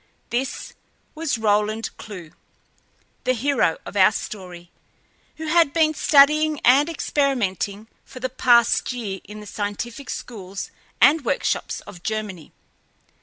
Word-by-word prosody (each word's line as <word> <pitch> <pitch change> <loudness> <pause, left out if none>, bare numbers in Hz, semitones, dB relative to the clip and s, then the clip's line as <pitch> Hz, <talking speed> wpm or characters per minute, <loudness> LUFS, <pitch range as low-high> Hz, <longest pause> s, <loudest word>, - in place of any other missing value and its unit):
This 255 +3 -3 0.4
was 310 -5 -2
Roland 215 +1 0
Clewe, 180 -7 -9 0.9
the 255 - +2
hero 245 - +1
of - - -9
our 195 +1 +6
story, 180 -5 -7 0.7
who 320 - -6
had 320 -2 +3
been 315 -2 +3
studying 300 +1 +4
and 275 +6 +5
experimenting 225 - -1 0.2
for 255 - -12
the 260 - -1
past 240 -2 +3
year 215 -6 -5
in 210 0 -10
the - - -10
scientific 210 +6 -5
schools 195 -5 -6 0.3
and 290 +3 +5
workshops 235 - -1
of 175 - -12
Germany. 210 -6 -4
230 Hz, 120 wpm, -23 LUFS, 205-280 Hz, 0.9 s, our